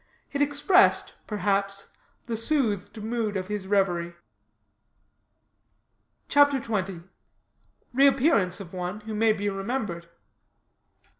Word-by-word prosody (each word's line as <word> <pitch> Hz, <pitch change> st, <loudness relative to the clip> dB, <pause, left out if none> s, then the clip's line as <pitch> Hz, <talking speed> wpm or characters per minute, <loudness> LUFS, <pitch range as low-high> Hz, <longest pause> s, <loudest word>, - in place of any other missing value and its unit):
It 280 Hz, -, -1 dB
expressed, 290 Hz, +7 st, +3 dB
perhaps, 200 Hz, -1 st, -1 dB, 0.3 s
the 235 Hz, -, -3 dB
soothed 225 Hz, -4 st, 0 dB
mood 220 Hz, -2 st, -2 dB
of 185 Hz, +1 st, -5 dB
his 205 Hz, -2 st, -4 dB
reverie. 175 Hz, -4 st, 0 dB, 2.1 s
CHAPTER 285 Hz, -1 st, +4 dB
XX. 195 Hz, -7 st, -3 dB, 0.9 s
REAPPEARANCE 265 Hz, -, +3 dB
OF 190 Hz, -3 st, -10 dB
ONE 180 Hz, +3 st, -4 dB
WHO 220 Hz, +1 st, -7 dB
MAY 220 Hz, +1 st, +3 dB
BE 205 Hz, -1 st, -3 dB
REMEMBERED. 195 Hz, -4 st, -4 dB
210 Hz, 95 wpm, -26 LUFS, 195-245 Hz, 2.1 s, CHAPTER